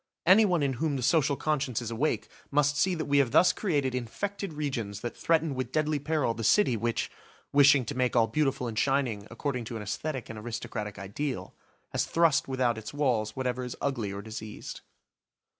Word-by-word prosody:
Anyone 185 -3 +5
in 135 -1 +1
whom 155 -3 +1
the 130 - -3
social 145 0 +3
conscience 140 -5 -1
is 120 -2 -5
awake 135 +7 0 0.2
must 145 0 +2
see 185 +4 +2
that 160 - -3
we 145 -1 +3
have 135 -4 +3
thus 180 +9 +5
created 145 - 0
infected 195 - -4
regions 120 -10 -3
that 120 - -4
threaten 160 -2 +1
with 130 -1 -3
deadly 155 0 +1
peril 145 -4 0
the 115 - -6
city 165 - +4
which, 115 +1 -1 0.4
wishing 140 -2 +6
to 145 - -4
make 125 -2 0
all 115 -2 +5
beautiful 135 -1 0
and 110 -2 -2
shining 130 -7 0
according 125 +1 -3
to 115 - -6
an 105 - -6
aesthetic 130 +5 -4
and 110 -1 -7
aristocratic 105 -2 -5
ideal, 125 +8 -4 0.4
has - - 0
thrust 165 -3 +3
without 125 -4 0
its 110 +6 -8
walls 115 -7 0
whatever 125 -1 -2
is 125 - -5
ugly 120 -8 -2
or 100 0 -6
diseased. 110 0 -7
130 Hz, 190 wpm, -29 LUFS, 115-150 Hz, 0.4 s, wishing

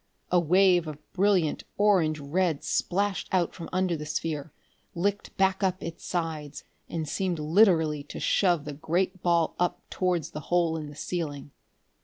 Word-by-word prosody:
A 180 - +5
wave 180 0 +4
of 150 0 -10
brilliant 185 -5 +2
orange 185 -7 +3
red 160 +2 0
splashed 200 +1 0
out 180 -3 +1
from 170 -3 -8
under 185 -2 +1
the 150 -1 -6
sphere, 155 -1 -3 0.4
licked 200 +4 -2
back 190 0 +2
up 185 -1 0
its 165 -1 -7
sides, 160 -4 -3 0.3
and 160 -2 -3
seemed 180 +3 -1
literally 160 -2 +3
to - - -8
shove 175 -6 +2
the 150 - -5
great 180 +5 -1
ball 170 -2 +2
up 180 0 +1
towards 180 -4 0
the 150 - -5
hole 170 -2 +2
in 155 -2 -4
the 145 - -11
ceiling. 145 -4 -4
170 Hz, 160 wpm, -27 LUFS, 155-185 Hz, 0.4 s, A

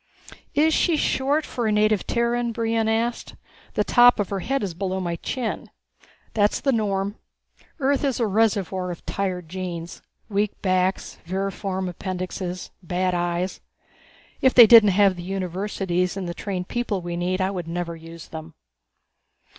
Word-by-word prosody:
"Is 310 +2 +4
she 335 -1 +2
short 290 +2 +1
for 240 -3 -2
a - - +2
native 210 -1 +2
Terran?" 235 0 0
Brion 225 -1 0
asked. 230 +2 -1 0.4
"The - - +2
top 245 -1 +6
of 205 - 0
her 195 - -2
head 270 +7 -1
is 190 -4 -3
below 190 +1 -2
my 175 -2 -2
chin." 245 +5 -4 0.6
"That's 210 -1 +2
the 275 - +1
norm. 205 -3 -1 0.6
Earth 275 0 +1
is 270 -3 0
a 235 - +2
reservoir 195 -3 +1
of 175 - -7
tired 185 -4 -3
genes. 175 -1 -6 0.3
Weak 205 0 -1
backs, 185 0 0
vermiform 190 +1 -2
appendixes, 185 0 -5
bad 180 +1 -1
eyes. 175 +1 -2 0.8
If 260 - +4
they 240 - +11
didn't 220 -2 +8
have 200 -3 +4
the - - -6
universities 185 0 -2
and 190 -2 -3
the 170 - -3
trained 180 -1 -4
people 225 -6 -2
we 175 0 -4
need 180 +2 -1
I 190 +1 +1
would 180 -4 -5
never 170 0 -3
use 165 0 -11
them." 160 0 -9
195 Hz, 155 wpm, -24 LUFS, 180-225 Hz, 0.8 s, they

